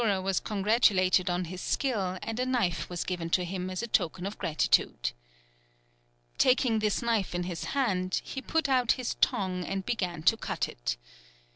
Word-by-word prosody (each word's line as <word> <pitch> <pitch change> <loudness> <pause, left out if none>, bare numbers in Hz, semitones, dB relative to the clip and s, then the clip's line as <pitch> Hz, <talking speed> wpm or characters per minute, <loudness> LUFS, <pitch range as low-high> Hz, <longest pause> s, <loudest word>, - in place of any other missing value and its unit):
The - - +1
conjuror 195 -2 +1
was 190 -1 +1
congratulated 195 -3 +3
on 175 0 0
his 180 +2 -7
skill, 200 -10 -1
and 225 +1 -4
a 255 - +1
knife 185 - 0
was 175 -1 -3
given 175 -3 -3
to 180 +1 +2
him 185 +1 -4
as 185 +4 -3
a - - -2
token 180 -3 0
of 200 +2 -5
gratitude. 155 -2 +1 1.3
Taking 250 -3 +4
this 215 +1 0
knife 225 -6 0
in 175 - -1
his 175 -2 -4
hand, 185 -8 +1
he 270 - -5
put 320 +1 0
out 255 -3 +3
his 255 -2 -3
tongue, 185 -2 +1
and 195 +1 -3
began 180 -8 -2
to 200 - +5
cut - - -2
it. - - -4
190 Hz, 180 wpm, -29 LUFS, 180-230 Hz, 1.3 s, to